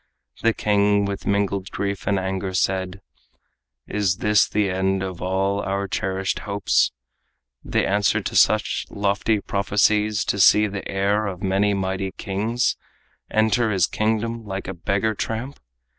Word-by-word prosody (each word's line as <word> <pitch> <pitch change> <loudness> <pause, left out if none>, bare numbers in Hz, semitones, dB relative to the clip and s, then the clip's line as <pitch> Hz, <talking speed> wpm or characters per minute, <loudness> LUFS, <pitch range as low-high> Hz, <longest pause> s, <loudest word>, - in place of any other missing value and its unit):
The 115 -1 +2
king 100 -1 +2
with 100 -1 -5
mingled 100 -1 0
grief 100 0 -4
and 100 - +2
anger 95 0 -3
said: 95 +1 -1 0.8
"Is 100 -4 0
this 105 -2 +3
the 105 -1 +1
end 95 +1 0
of 95 -2 -6
all 95 +2 0
our 100 0 -2
cherished 95 0 -2
hopes, 100 -1 +1 0.7
The - - 0
answer 100 0 +2
to - - -5
such - - +3
lofty 100 +2 0
prophecies, 105 +2 +1
To 100 - -1
see 105 +3 +6
the 100 -1 -5
heir 100 +2 0
of 95 -2 -6
many 100 +1 +2
mighty 95 0 -2
king's 110 +5 -1 0.5
Enter 110 +1 +2
his 95 -5 +3
kingdom 110 +1 -1
like 95 -2 -5
a 95 - -4
beggar 100 +5 -1
tramp? 115 +6 -4
100 Hz, 145 wpm, -23 LUFS, 95-105 Hz, 0.8 s, see